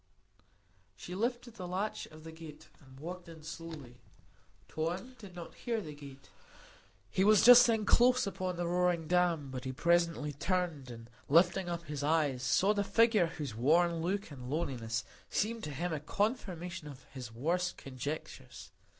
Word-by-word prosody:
She 175 Hz, -, -8 dB
lifted 240 Hz, +4 st, -2 dB
the 180 Hz, -3 st, -5 dB
latch 190 Hz, +4 st, -3 dB
of 155 Hz, 0 st, -14 dB
the 160 Hz, -, -8 dB
gate 160 Hz, -1 st, -12 dB
and 130 Hz, -2 st, -16 dB
walked 175 Hz, +3 st, -7 dB
in 160 Hz, -2 st, -12 dB
slowly. 155 Hz, -6 st, -8 dB, 0.7 s
Tom 175 Hz, +10 st, -3 dB
did 195 Hz, -4 st, -11 dB
not 170 Hz, -2 st, -8 dB
hear 235 Hz, -2 st, -2 dB
the 155 Hz, -7 st, -7 dB
gate; 140 Hz, -2 st, -13 dB, 0.8 s
he 190 Hz, -, +2 dB
was 215 Hz, +1 st, +6 dB
just 245 Hz, 0 st, +10 dB
then 220 Hz, -2 st, +1 dB
close 250 Hz, +3 st, +5 dB
upon 185 Hz, -2 st, -3 dB
the 175 Hz, 0 st, -2 dB
roaring 175 Hz, -2 st, +1 dB
dam; 170 Hz, -5 st, +1 dB
but 130 Hz, -1 st, -5 dB
he 130 Hz, -, -3 dB
presently 170 Hz, 0 st, +1 dB
turned, 165 Hz, -4 st, -1 dB
and 115 Hz, -1 st, -9 dB, 0.2 s
lifting 175 Hz, +4 st, +4 dB
up 170 Hz, -1 st, -3 dB
his 150 Hz, -3 st, -5 dB
eyes, 145 Hz, -4 st, +1 dB
saw 190 Hz, +10 st, +3 dB
the 205 Hz, -1 st, 0 dB
figure 225 Hz, -3 st, +4 dB
whose 150 Hz, -7 st, -5 dB
worn 165 Hz, +8 st, +3 dB
look 190 Hz, +1 st, -2 dB
and 125 Hz, -3 st, -8 dB
loneliness 120 Hz, -7 st, -2 dB, 0.3 s
seemed 225 Hz, +2 st, -1 dB
to 150 Hz, -, -5 dB
him 165 Hz, +4 st, -2 dB
a 155 Hz, -, -2 dB
confirmation 180 Hz, -, -2 dB
of 135 Hz, -3 st, -10 dB
his 125 Hz, -4 st, -8 dB
worst 170 Hz, +10 st, -1 dB
conjectures. 135 Hz, +3 st, -7 dB
170 Hz, 165 wpm, -32 LUFS, 145-185 Hz, 0.8 s, just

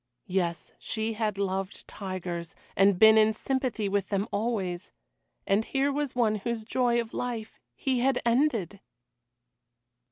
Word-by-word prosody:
Yes, 175 Hz, -2 st, -2 dB
she 220 Hz, 0 st, -2 dB
had 215 Hz, -2 st, -1 dB
loved 195 Hz, 0 st, -3 dB
tigers, 180 Hz, -4 st, -5 dB, 0.2 s
and 195 Hz, -1 st, +4 dB
been 220 Hz, +2 st, +8 dB
in 220 Hz, 0 st, +4 dB
sympathy 255 Hz, -3 st, -1 dB
with 200 Hz, -1 st, -1 dB
them 200 Hz, +1 st, 0 dB
always, 200 Hz, -4 st, -2 dB, 0.5 s
and 200 Hz, +3 st, +2 dB
here 275 Hz, +4 st, 0 dB
was 285 Hz, -2 st, -2 dB
one 220 Hz, -3 st, +2 dB
whose 225 Hz, +2 st, -3 dB
joy 240 Hz, +1 st, +1 dB
of 230 Hz, -1 st, -4 dB
life 235 Hz, -3 st, -4 dB, 0.2 s
he 260 Hz, -2 st, 0 dB
had 260 Hz, +1 st, +2 dB
ended! 235 Hz, -, +1 dB
220 Hz, 135 wpm, -28 LUFS, 195-240 Hz, 0.5 s, been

